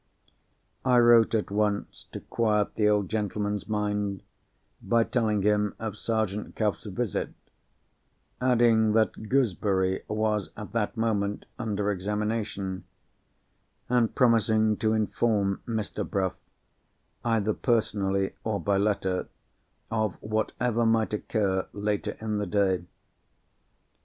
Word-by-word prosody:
I 125 Hz, -1 st, +4 dB
wrote 120 Hz, -1 st, +6 dB
at 105 Hz, -2 st, -1 dB
once 105 Hz, 0 st, -1 dB
to -, -, -7 dB
quiet 105 Hz, -3 st, 0 dB
the 105 Hz, -1 st, +2 dB
old 105 Hz, -2 st, +2 dB
gentleman's 105 Hz, -1 st, -2 dB
mind, 105 Hz, -2 st, -1 dB, 0.6 s
by 115 Hz, -1 st, +3 dB
telling 110 Hz, -5 st, 0 dB
him 105 Hz, 0 st, +2 dB
of 110 Hz, -3 st, -4 dB
Sergeant 110 Hz, -2 st, -2 dB
Cuff's 105 Hz, 0 st, -1 dB
visit: 105 Hz, 0 st, -3 dB, 1.1 s
adding 115 Hz, -3 st, +4 dB
that 110 Hz, -1 st, +1 dB
Gooseberry 95 Hz, -7 st, +1 dB
was 105 Hz, -4 st, 0 dB
at 105 Hz, -, -7 dB
that 115 Hz, +1 st, -1 dB
moment 105 Hz, -3 st, -1 dB
under 105 Hz, -3 st, -1 dB
examination; 105 Hz, -1 st, -2 dB, 1.1 s
and 120 Hz, -2 st, +2 dB
promising 110 Hz, -3 st, +3 dB
to 110 Hz, 0 st, +1 dB
inform 105 Hz, -2 st, +1 dB
Mr. 110 Hz, -3 st, -2 dB
Bruff, 95 Hz, -3 st, 0 dB, 0.9 s
either 110 Hz, -2 st, +1 dB
personally, 100 Hz, -5 st, 0 dB
or 110 Hz, -2 st, -1 dB
by 100 Hz, -1 st, +1 dB
letter, 100 Hz, -3 st, 0 dB, 0.6 s
of 110 Hz, -4 st, 0 dB
whatever 110 Hz, +2 st, -1 dB
might 115 Hz, -1 st, +2 dB
occur 100 Hz, -3 st, 0 dB
later 105 Hz, 0 st, -2 dB
in 110 Hz, -1 st, -2 dB
the 105 Hz, -, -2 dB
day. 95 Hz, -4 st, +1 dB
105 Hz, 110 wpm, -27 LUFS, 100-110 Hz, 1.1 s, wrote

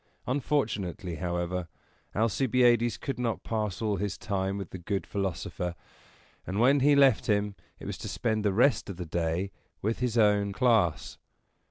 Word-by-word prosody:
Unfortunately, 105 Hz, -, -1 dB
however, 85 Hz, +1 st, -2 dB, 0.5 s
Alcibiades 120 Hz, +1 st, +3 dB
could 135 Hz, -3 st, -4 dB
not 115 Hz, -3 st, -1 dB
pass 110 Hz, -2 st, -2 dB
all 105 Hz, -2 st, +1 dB
his 100 Hz, 0 st, -2 dB
time 95 Hz, -1 st, -2 dB
with 100 Hz, -3 st, -6 dB
the 95 Hz, -, -7 dB
good 95 Hz, +3 st, -2 dB
philosopher, 90 Hz, -2 st, -3 dB, 0.7 s
and 95 Hz, +3 st, -2 dB
when 135 Hz, +4 st, +5 dB
he 145 Hz, +2 st, +5 dB
left 135 Hz, -5 st, +5 dB
him 105 Hz, -1 st, +1 dB, 0.2 s
it -, -, -11 dB
was -, -, -5 dB
to -, -, -5 dB
spend 110 Hz, -3 st, -1 dB
the 105 Hz, -, +2 dB
rest 120 Hz, +4 st, +3 dB
of 95 Hz, -, -6 dB
the 90 Hz, -, -5 dB
day 85 Hz, +4 st, -1 dB, 0.3 s
with 110 Hz, +3 st, 0 dB
his 120 Hz, -2 st, 0 dB
own 105 Hz, -2 st, +3 dB
class. 110 Hz, -, +1 dB
105 Hz, 160 wpm, -29 LUFS, 95-120 Hz, 0.7 s, when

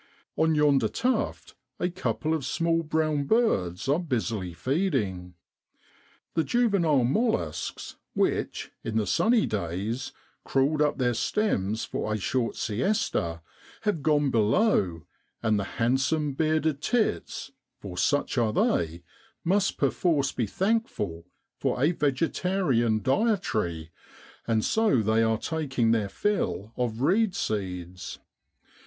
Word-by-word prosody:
On 160 Hz, 0 st, +2 dB
yonder 150 Hz, -2 st, +4 dB
tuft 255 Hz, +1 st, -1 dB, 0.3 s
a 180 Hz, -, +1 dB
couple 170 Hz, -3 st, -2 dB
of 160 Hz, -3 st, -1 dB
small 165 Hz, +4 st, +1 dB
brown 155 Hz, -2 st, 0 dB
birds 115 Hz, -, +1 dB
are 145 Hz, +4 st, +3 dB
busily 115 Hz, -, -2 dB
feeding. 100 Hz, -, -1 dB, 1.0 s
The 165 Hz, -, +2 dB
juvenile 190 Hz, -, +2 dB
molluscs, 135 Hz, -, -1 dB, 0.2 s
which, -, -, -1 dB
in 110 Hz, -1 st, -2 dB
the 110 Hz, -, +1 dB
sunny 230 Hz, -, +3 dB
days 105 Hz, +6 st, -3 dB, 0.3 s
crawled 140 Hz, +3 st, +1 dB
up 150 Hz, -1 st, +2 dB
their 125 Hz, -2 st, +1 dB
stems 110 Hz, -, 0 dB
for 110 Hz, -, -3 dB
a 110 Hz, -, 0 dB
short 115 Hz, +5 st, -1 dB
siesta, 105 Hz, -, -1 dB, 0.4 s
have 210 Hz, -8 st, 0 dB
gone 145 Hz, -2 st, +2 dB
below, 105 Hz, -, +2 dB, 0.4 s
and 110 Hz, -2 st, +2 dB
the -, -, -1 dB
handsome 135 Hz, +5 st, +1 dB
bearded 155 Hz, 0 st, +1 dB
tits, 220 Hz, -, -1 dB, 0.3 s
for 95 Hz, -3 st, -8 dB
such 145 Hz, +7 st, +1 dB
are 115 Hz, -2 st, +2 dB
they, 85 Hz, -3 st, 0 dB, 0.4 s
must 195 Hz, +3 st, +1 dB
perforce 145 Hz, -6 st, +1 dB
be 115 Hz, -, -2 dB
thankful 145 Hz, -, -1 dB, 0.3 s
for -, -, 0 dB
a 145 Hz, +6 st, +4 dB
vegetarian 140 Hz, -, +1 dB
dietary, 110 Hz, -, 0 dB, 0.6 s
and 110 Hz, -2 st, +1 dB
so 220 Hz, -, +3 dB
they 110 Hz, +2 st, +3 dB
are 110 Hz, -1 st, +2 dB
taking 135 Hz, -5 st, 0 dB
their 110 Hz, -3 st, +1 dB
fill 115 Hz, -, -1 dB
of 120 Hz, -2 st, -2 dB
reed 195 Hz, +6 st, +2 dB
seeds. 90 Hz, -3 st, -4 dB
135 Hz, 120 wpm, -27 LUFS, 110-165 Hz, 1.0 s, yonder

